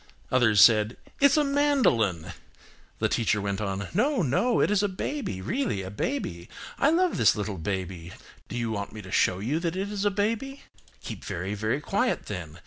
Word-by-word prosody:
Others 115 -5 +4
said, 110 0 +4 0.2
"It's 280 +1 +5
a 300 - +4
mandolin." 265 - +1 0.6
The - - +1
teacher 110 -2 +1
went 100 0 -2
on–"No, 140 - 0
no, 165 - +1
it - - +2
is 205 -1 +3
a 205 - +2
baby, 190 - -4
really 170 - -2
a 95 - -7
baby. 100 - -3 0.3
I 280 - +4
love 355 +2 +2
this - - +4
little 105 -3 -4
baby. 90 -1 -4 0.4
Do 120 - -5
you 115 -2 -2
want 100 -2 -4
me 110 -1 -8
to 95 - -10
show 90 - +2
you 125 +11 -1
that 170 0 -2
it 195 +2 -3
is 205 -1 -3
a 205 - +3
baby? 225 +7 -2 0.4
Keep - - -7
very, 95 +4 -4
very 110 +6 -1
quiet 205 - 0
then. 85 -6 -6
120 Hz, 185 wpm, -27 LUFS, -, 0.6 s, It's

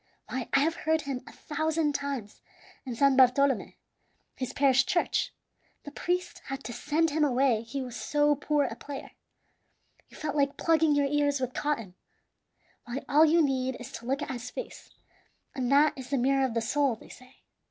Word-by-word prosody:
Why, 255 -1 -4
I 275 - +5
have 320 +3 +2
heard 320 0 +1
him 275 -4 -4
a - - -10
thousand 315 0 -1
times 275 -7 -4 0.5
in 245 - -3
San 275 +2 +4
Bartolome, 260 -2 +3 0.6
his 255 -3 -4
parish 270 -1 +3
church; 345 - 0 0.5
the 290 - -9
priest 355 +3 -2
had 270 0 -5
to 240 - -6
send 300 +6 0
him 305 +1 +1
away 255 -4 +2
he 255 +4 -5
was 245 -2 -7
so 295 0 +2
poor 290 +1 +1
a - - -4
player. 280 -1 -8 1.0
You - - -15
felt 305 -1 -3
like 280 -1 +1
plugging 320 -2 +3
your 285 -1 +3
ears 285 0 +1
with 255 -1 -3
cotton. 230 -11 -2 0.9
Why, 250 +3 -5
all 300 +3 +6
you 325 +1 +4
need 260 -2 0
is 245 - -9
to 230 +1 -8
look 275 +3 0
at - - -5
his 245 -1 -5
face, - - -8 0.6
and 255 -1 -2
that 295 +2 +5
is 260 -2 -9
the 280 - +1
mirror 270 +2 +2
of 245 -3 -3
the 230 - +1
soul, 270 +2 +1
they - - -16
say. 255 +1 -15
275 Hz, 185 wpm, -28 LUFS, 255-295 Hz, 1.0 s, all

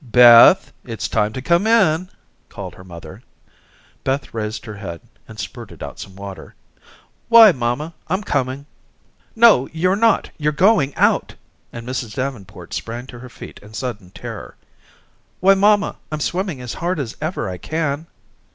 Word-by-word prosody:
"Beth, 120 -1 +7
it's - - -5
time 105 +1 0
to 130 - -6
come 170 +7 +2
in," 185 -6 +3 0.4
called - - -8
her 95 - -14
mother. 85 +2 -11 0.8
Beth 135 +1 -2
raised 110 +1 -4
her 110 - -7
head 85 -5 -7 0.3
and - - -12
spurted - - -8
out - - -8
some 95 - -9
water. 100 -1 -10 0.7
"Why, 230 -3 +9
mamma, 130 +4 -3
I'm 185 +5 -1
coming." 135 -4 -2 0.7
"No, 225 - +5
you're 185 +4 +1
not. 225 +2 +2
You're 150 0 0
going 180 -4 +3
out," - - +1 0.4
and 115 0 -9
Mrs. 125 -4 -4
Davenport 130 -7 -6
sprang 120 +2 -5
to 125 -2 -11
her 125 +1 -11
feet - - -11
in 105 +1 -14
sudden 110 -6 -5
terror. - - -9 0.8
"Why, 195 +2 +5
mamma, 205 +1 +2
I'm 155 - -3
swimming 175 -2 -2
as 125 -1 -6
hard 175 -1 -2
as 125 -4 -5
ever 155 - -3
I 90 -1 -6
can." 155 - -3
135 Hz, 155 wpm, -20 LUFS, 115-175 Hz, 0.8 s, Why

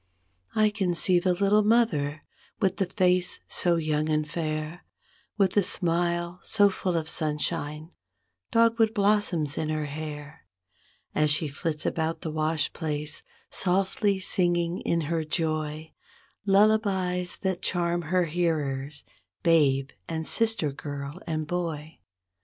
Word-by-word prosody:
I 215 -1 +4
can 190 -4 -1
see 180 +1 +4
the 180 0 +1
little 200 +3 +3
mother, 205 -10 +1 0.4
with 190 -3 +1
the 195 -3 0
face 180 -1 +2
so 175 -1 +2
young 155 -1 0
and 155 0 0
fair. 155 +1 -4 0.5
With 195 -3 +3
the 205 - +4
smile 175 -1 0
so 205 -2 +4
full 180 -2 -1
of 160 -1 -2
sunshine, 150 +1 -2 0.6
dogwood 230 0 +3
blossoms 200 -8 +2
in 155 - -2
her 155 -1 -1
hair. 150 +1 -7 0.7
As 150 0 +2
she 150 +2 +4
flits 150 +2 -3
about 160 0 -1
the 160 - -4
wash 155 -1 0
place, 150 -1 -2 0.3
softly 195 +2 +1
singing 175 -2 +1
in 170 - 0
her 160 +1 -1
joy 155 -1 -2 0.5
Lullabies 195 -3 +2
that 190 -2 -1
charm 175 -1 0
her 180 +3 +1
hearers, 150 -4 -2 0.4
babe 140 -5 +3 0.2
and 160 -1 -3
sister 225 -10 +2
girl 145 +3 -7
and 155 -1 -2
boy. 160 -2 -4
170 Hz, 130 wpm, -27 LUFS, 155-185 Hz, 0.7 s, I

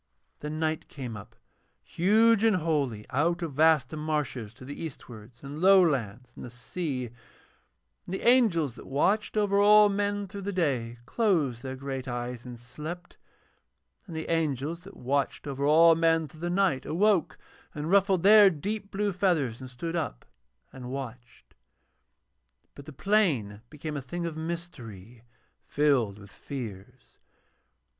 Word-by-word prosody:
Then 150 +1 -5
night 155 -1 -1
came 125 -5 -7
up, 105 +2 -11 0.5
huge 220 +4 +3
and 225 -3 +4
holy, 145 -11 -1
out 170 +6 0
of 155 -5 -5
waste 155 -2 +3
marshes 150 -8 -3
to 130 - -12
the 145 +4 -7
eastwards 120 -6 -10
and 145 +3 -7
low 195 +1 +7
lands 125 -3 -3
and - - -10
the 125 - -7
sea; 125 0 -5 1.0
and 185 - -3
the - - -6
angels 200 - +4
that - - -13
watched 200 +11 0
over 200 -1 +2
all 210 0 +7
men 205 0 -1
through 200 +1 -8
the 200 +1 -3
day 130 -10 -1
closed 155 - 0
their 130 0 -5
great 135 -1 -5
eyes 120 0 -5
and 120 -2 -9
slept, 155 +9 -9 0.9
and 170 - -8
the 160 - -4
angels 160 -1 -1
that 190 +3 -14
watched 140 +3 -1
over 140 -1 -4
all 165 +3 +6
men 165 -1 +2
through 155 +3 -16
the 175 - -2
night 180 -7 +1
awoke 185 +2 +1 0.4
and 150 +3 -4
ruffled 195 -3 +3
their 205 0 +8
deep 200 +5 -4
blue 205 0 -1
feathers 160 - 0
and 130 - -8
stood 165 +7 -5
up 155 - -4 0.5
and 125 -2 -8
watched. 125 -2 -8 1.2
But 140 - -12
the 155 - -9
plain 140 - 0
became 150 0 -6
a 140 - -3
thing 170 +7 -5
of 165 -2 -4
mystery 130 - -7 0.5
filled 135 -9 +1
with 100 -1 -14
fears. 120 0 -9
150 Hz, 150 wpm, -28 LUFS, 125-180 Hz, 1.2 s, their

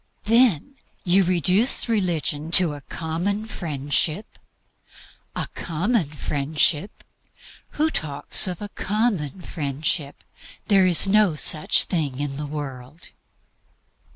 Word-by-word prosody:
Then 235 - +1 0.3
you 190 +1 +2
reduce 185 - +2
religion 170 -8 -1
to 170 -4 +6
a 145 - -10
common 175 +9 -4
Friendship? 155 +1 -2 1.0
A - - -3
common 180 +5 -2
Friendship 150 +4 -1 0.7
who 310 +1 +1
talks 145 - +2
of 180 +2 -6
a 205 - -7
common 205 -7 -2
Friendship? 150 -2 -3 0.4
There 195 -3 +3
is 175 +1 +5
no 205 -4 +2
such 155 +1 +4
thing 145 -7 -3
in 145 -1 -4
the 150 0 -5
world. 145 0 -9
170 Hz, 105 wpm, -22 LUFS, 145-200 Hz, 1.0 s, to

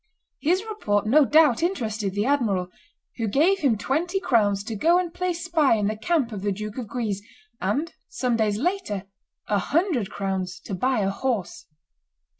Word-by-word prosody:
His 360 +6 +2
report 210 - -1
no 280 +7 +5
doubt 300 -4 +5
interested 220 - -1
the 205 +1 0
admiral, 215 -10 +1 0.5
who 230 -2 -1
gave 325 - +3
him 265 - +2
twenty 330 - -1
crowns 205 - +2
to 220 +1 -5
go 335 - +4
and 355 -2 -1
play 365 0 -1
spy 335 -6 +2
in 210 -2 0
the 215 +2 0
camp 270 +1 0
of 205 -3 -5
the 205 0 0
Duke 210 +4 -5
of 240 - -5
Guise, 210 -3 -3 0.4
and, 275 - -1 0.2
some 250 -2 -1
days 215 -2 +1
later, 285 - -2 0.4
a 205 - +2
hundred 295 - 0
crowns 190 -2 -3
to 195 - -7
buy 250 +4 +1
a 195 0 +1
horse. 205 -4 -3
230 Hz, 175 wpm, -24 LUFS, 205-320 Hz, 0.5 s, no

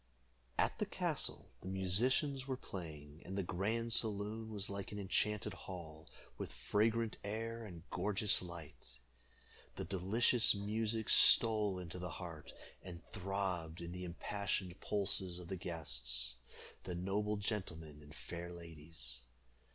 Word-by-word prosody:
At - - +2
the - - 0
castle - - 0
the - - -8
musicians 125 +9 +2
were 130 -1 -1
playing, 80 - -8
and 95 +2 -5
the 100 - +1
grand 110 +6 0
saloon 110 0 +1
was 105 -2 +1
like 100 -1 -5
an 105 - -5
enchanted 105 +1 +1
hall, 85 -4 -8 0.3
with - - -4
fragrant 110 - +1
air 115 +3 -3
and 85 -4 -9
gorgeous 100 +2 +3
light. 85 -8 -10 0.8
The - - -4
delicious 110 +5 +4
music 110 +2 0
stole 105 -4 +7
into 90 0 -6
the 90 0 -4
heart, 85 -3 -7 0.3
and 90 -2 -9
throbbed 95 -5 -2
in 85 0 -6
the 90 +1 -5
impassioned 95 +1 -2
pulses 95 -3 -1
of 90 -1 -9
the 95 - -2
guests, 65 -8 -1 0.5
the 90 - -3
noble 105 +4 0
gentlemen 85 -8 -3
and 75 0 -13
fair 85 0 -6
ladies. 80 -7 -7
95 Hz, 135 wpm, -37 LUFS, 85-105 Hz, 0.8 s, stole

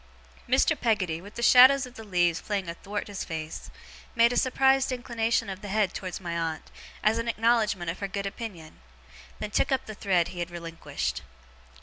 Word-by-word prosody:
Mr. 265 +5 +4
Peggotty, 200 - 0
with 205 +3 -13
the 235 - -4
shadows 260 +2 +7
of 250 - -12
the 225 - -10
leaves 175 -4 +1
playing 200 -4 -3
athwart 195 +5 -5
his 200 -2 -5
face, 160 -1 -6 0.5
made 235 +1 +5
a - - -2
surprised 265 +1 +3
inclination 235 -3 -1
of 190 -1 -6
the 205 - -7
head 200 -2 +1
towards 185 -2 -5
my 170 -3 -4
aunt, 165 -2 -3 0.3
as 220 +2 +3
an 230 - -3
acknowledgement 225 -5 +1
of 175 - -9
her 200 - -2
good 200 +1 -4
opinion; 195 -6 -7 0.6
then 210 - -5
took 270 - +1
up 265 - 0
the 215 - -7
thread 185 -5 +1
he 175 - -8
had 175 0 -3
relinquished. 170 -1 -4
205 Hz, 190 wpm, -27 LUFS, 175-235 Hz, 0.6 s, shadows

